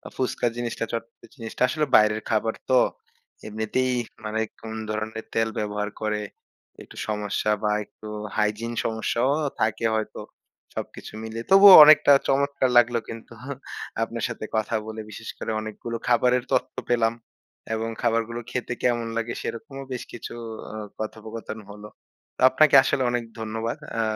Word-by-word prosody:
ফুচকা 125 -1 0
জিনিসটা 120 -1 -2
চটপট 115 0 -6
জিনিসটা। 115 -2 -9
আসলে 155 +3 0
বাইরের 105 0 +5
খাবার 110 0 +1
তো 130 - +5 0.7
এমনিতেই 110 +4 -1 0.3
মানে 110 +1 -2 0.2
কোন 110 0 -7
ধরনের 110 +1 -4
তেল 115 0 +1
ব্যবহার 105 0 -2
করে। 105 -1 -1 0.6
একটু - - -16
সমস্যা 105 0 -1
বা 105 - +2
একটু 110 - -13 0.3
হাইজিন 105 +2 0
সমস্যাও 115 +3 0 0.3
থাকে 110 +1 +1
হয়তো 110 - -3 0.5
সবকিছু - - -7
মিলিয়ে। 115 +1 -5
তবুও 195 0 +10
অনেকটা 150 -1 +7 0.2
চমৎকার 140 -1 +2
লাগলো 120 0 +5
কিন্তু 115 +1 -9 0.7
আপনার 115 +1 -4
সাথে 115 -2 -6
কথা 110 +1 0
বলে 110 0 -5
বিশেষ 110 +1 -8
করে 110 - -4
অনেকগুলো 110 +2 -5
খাবারের 125 +1 +3
তথ্য - - 0 0.2
পেলাম। 115 -1 +2 0.6
এবং 115 +1 -2
খাবারগুলো 115 0 0
খেতে 125 0 -2
কেমন 120 -2 +1
লাগে 115 +1 -2
সেরকমও 135 +3 -6
বেশ 125 - -4
কিছু 120 - -7 0.4
ও - - -6 0.2
কথোপকথন 110 0 -6
হলো। 105 +1 -10 0.5
তো - - -8
আপনাকে 140 +2 +5
আসলে 140 -2 0
অনেক 120 -1 -1 0.2
ধন্যবাদ 110 +1 -3 0.2
আ - - +3
115 Hz, 140 wpm, -25 LUFS, 110-120 Hz, 0.7 s, তবুও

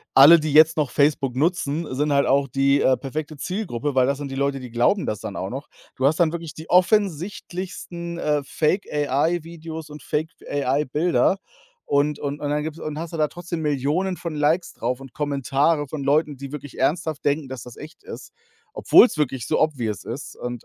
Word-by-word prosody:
alle, 150 +5 +9
die 155 0 -2
jetzt 155 +2 +6
noch 150 -4 +1
Facebook 140 -2 +1
nutzen, 160 +1 0
sind 150 +3 0
halt 140 0 +3
auch 140 +1 +2
die, 140 +2 +2
äh, 130 -1 +3
perfekte 150 +2 -5
Zielgruppe, 150 - -3
weil 130 -1 +3
das 140 0 0
sind 140 -1 -6
die - - -5
Leute, 140 0 0
die 125 -2 -9
glauben 120 - +2
das 105 - -3
dann 105 -2 -6
auch 95 +1 -4
noch. 135 +4 -6 0.3
Du 130 - +2
hast 155 +5 +1
dann 165 -2 +4
wirklich 165 -2 -6
die 160 +1 -10
offensichtlichsten, 180 -2 0
äh, 150 -3 0
Fake-AI-Videos 160 0 -1
und 150 - -10
Fake-AI-Bilder 150 +3 0 0.5
und 145 +1 +1
und 145 0 -4
und 145 -1 -3
dann 150 0 0
gibt's 155 +1 -6
und 150 -1 -5
hast 170 0 -6
du - - -3
da 155 -1 +2
trotzdem 175 0 -6
Millionen 150 +6 0
von 170 -3 -5
Likes 155 +4 +1
drauf 125 +2 -2
und 135 -2 -12
Kommentare 145 +1 0
von 145 0 -5
Leuten, 145 0 +1
die 140 0 -8
wirklich 145 -2 -8
ernsthaft 155 +2 0
denken, 145 0 +1
dass 130 -3 -7
das 125 - -12
echt 155 +5 -12
ist, - - -9 0.4
obwohl's 240 - +5
wirklich 135 -5 -1
so - - +1
obvious 120 - -1
ist. 130 +4 -7
Und, 120 -1 -6
150 Hz, 190 wpm, -23 LUFS, 135-160 Hz, 0.5 s, alle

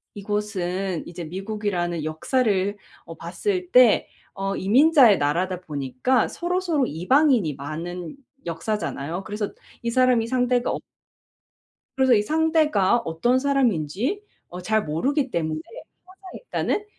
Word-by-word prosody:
이곳은 195 -3 -3
이제 170 0 -7
미국이라는 185 -2 -3
역사를 200 - 0 0.3
어 165 - -9
봤을 360 - -3
때 250 -3 +6 0.3
어 195 0 -2
이민자의 255 - +5
나라다 175 +6 0
보니까 145 - -1
서로서로 345 -5 -1
이방인이 220 - +2
많은 165 - -6 0.3
역사잖아요. 170 -1 -3
그래서 210 -1 -4 0.3
이 235 - -2
사람이 250 -2 +3
상대가 250 0 +1
어 - - -3 1.2
그래서 265 -1 +4
이 210 - +4
상대가 305 - +2
어떤 230 +9 0
사람인지 255 - 0 0.3
어 180 +1 -8
잘 220 +2 +1
모르기 265 - 0
때문에 155 -2 -2 0.5
항상 375 0 -15
일단은 420 -3 -2
205 Hz, 285 characters per minute, -23 LUFS, 175-260 Hz, 1.2 s, 때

